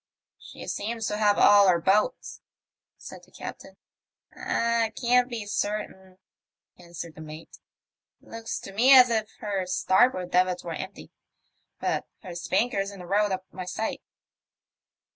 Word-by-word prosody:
^' - - -67 0.4
She - - -11
seems 225 +1 -3
to 210 - -2
have 210 -1 +3
all 205 -1 +6
her 175 -2 +4
boats," 205 - 0 0.6
said - - -11
the - - -20
captain. - - -10 0.4
" - - -35
I 230 -1 0
can't 250 0 +3
be 230 -4 -5
certain," 205 -2 -4 0.6
answered 170 -1 -9
the 155 - -12
mate. 155 +1 -11 0.3
'* - - -67
Looks 230 0 -6
to 195 - -10
me 255 +6 +6
as 250 -2 +8
if 220 -2 0
her 195 -3 -2
starboard 185 0 +2
davits 180 0 +1
were 170 - -5
empty; 190 +4 -8 0.7
but - - -2 0.2
her 180 -3 -8
spanker's 195 +4 -1
in 200 - -11
the 180 - -9
road 205 +3 +1
of 190 0 -2
my 185 0 -7
sight." 220 +5 -4
200 Hz, 155 wpm, -26 LUFS, 185-225 Hz, 0.7 s, as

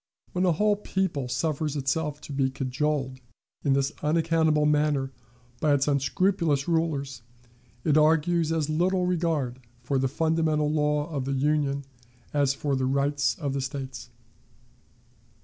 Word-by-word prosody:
When 180 +1 0
a - - +4
whole 210 +4 +2
people 190 -10 -2
suffers 150 +3 -1
itself 150 +2 -1
to 145 - -8
be 135 -1 +1
cajoled 130 0 -2 0.4
in 140 - +3
this 135 0 +1
unaccountable 160 -1 +2
manner 150 -3 +1 0.5
by 150 -2 +3
its 140 0 +1
unscrupulous 145 +1 +1
rulers, 145 -6 -1 0.6
it 155 0 +4
argues 160 +1 +3
as 160 -3 0
little 180 +4 +1
regard 160 -8 -1 0.2
for 135 +2 0
the 135 - +1
fundamental 155 +1 +1
law 150 -1 +1
of 140 -4 -2
the 140 - -1
Union 140 0 0 0.5
as 140 -2 +2
for 140 -1 -1
the 130 -1 0
rights 140 +1 +1
of 140 -4 -3
the 135 - -1
States. 130 -3 -6
150 Hz, 140 wpm, -26 LUFS, 135-160 Hz, 0.6 s, a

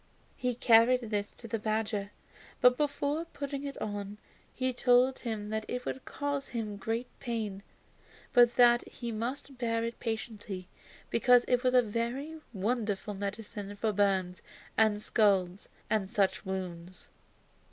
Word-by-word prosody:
He 250 -1 -1
carried 235 +1 +5
this 205 -1 -1
to 230 - -11
the 225 0 -2
badger, 215 -2 -1 0.5
but 250 0 +6
before 295 +2 -1
putting 280 -3 -5
it 280 -1 -5
on 205 -1 -4 0.3
he 255 0 -1
told 250 +1 +4
him 215 -3 -4
that 220 0 -2
it 250 0 -4
would 265 - -4
cause 285 -1 -3
him 215 -4 -4
great 225 +4 -2
pain, 220 -6 -3 0.7
but 240 -1 +6
that 240 -1 +6
he 235 -1 -6
must 250 +4 -4
bear 230 -1 0
it 230 0 -4
patiently, 215 -5 -4 0.4
because 245 +1 +5
it 250 -1 +3
was 255 0 +3
a 250 - +7
very 240 +8 -3
wonderful 210 -1 -1
medicine 205 0 -5
for 215 +2 0
burns 190 -3 +1 0.3
and 215 -1 +3
scalds 195 -4 +2 0.2
and 205 -3 0
such 195 0 +1
wounds. 185 -1 -5
225 Hz, 140 wpm, -31 LUFS, 205-250 Hz, 0.7 s, a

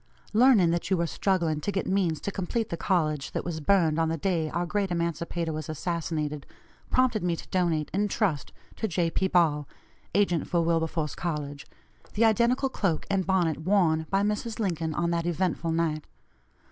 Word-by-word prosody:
Learning 220 -7 +5
that 170 0 -1
you 190 - +2
were 170 - +1
struggling 170 -4 0
to 205 - -1
get 195 - -2
means 180 -5 +1
to 200 - -4
complete 200 +4 -2
the - - -2
college 155 -5 0
that - - -3
was 170 -2 -3
burned 165 -2 +3
on 160 -1 +2
the 165 - -1
day 165 -2 0
our 170 +3 -1
great 200 +2 -1
emancipator 170 -1 -2
was 155 -1 -5
assassinated, 155 -3 -3 0.4
prompted 255 -4 +2
me 175 -1 0
to - - -9
donate, 170 -5 0
in 205 +2 +1
trust 185 -8 -1 0.2
to 220 - -2
J. 170 -2 0
P. 190 - +1
Ball 155 -6 +2 0.5
(agent 195 -5 +2
for 170 - +1
Wilberforce 165 -2 0
College), 150 -3 -4 0.5
the 225 +3 +4
identical 235 +4 +3
cloak 195 -11 -1
and 190 -2 0
bonnet 175 -5 +1
worn 160 -3 +2
by 195 0 +2
Mrs. 210 +2 -2
Lincoln 165 -6 -1
on 170 0 0
that 170 0 -1
eventful 175 -1 -1
night. 160 -2 -1
170 Hz, 180 wpm, -27 LUFS, 160-195 Hz, 0.5 s, Learning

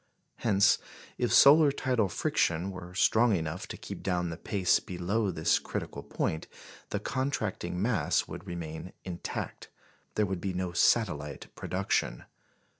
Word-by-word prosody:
Hence, 105 -2 +4 0.4
if - - +1
solar 145 +1 +8
tidal 125 -7 0
friction 85 +1 0
were 90 -1 -9
strong 110 +3 +4
enough 80 +1 -3
to - - -7
keep - - -8
down 90 -2 -1
the - - -4
pace 90 +2 +2
below 95 +4 -1
this 80 -3 +2
critical - - -5
point, 80 - -2 0.4
the 105 - -1
contracting 110 -8 -2
mass 100 -7 +1
would 100 - -8
remain 85 0 -6
intact 90 -2 -5 0.5
there 105 - +3
would 95 -2 -3
be 95 -1 -2
no 90 -1 -2
satellite 75 - +1
production. - - -1
90 Hz, 135 wpm, -30 LUFS, 85-110 Hz, 0.5 s, solar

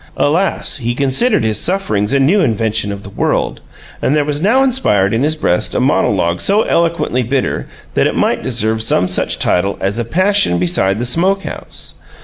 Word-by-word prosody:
Alas! 165 +5 0
he 120 -2 -3
considered 140 - +1
his 110 -1 0
sufferings 175 - -1
a 140 - +3
new 145 +10 +3
invention 110 - 0
in 100 0 -7
the 100 - -10
world, - - -1 0.4
and 140 - +1
there 150 -1 +1
was 145 0 -2
now 240 +8 +3
inspired 175 - +1
in 115 - 0
his 155 +2 +1
breast 90 - 0
a - - +2
monologue 85 +1 +1
so 205 +2 +2
eloquently 170 -7 0
bitter 130 +2 -2 0.3
that - - +2
it - - -3
might - - 0
deserve 110 +1 -1
some 90 -4 +1
such 90 - -1
title 95 +3 0
as 100 +4 -1
A - - 0
Passion 185 - +2
Beside 90 +2 +1
the 120 - -2
Smoke 185 +10 +1
house. - - -8
125 Hz, 185 wpm, -15 LUFS, 105-170 Hz, 0.4 s, a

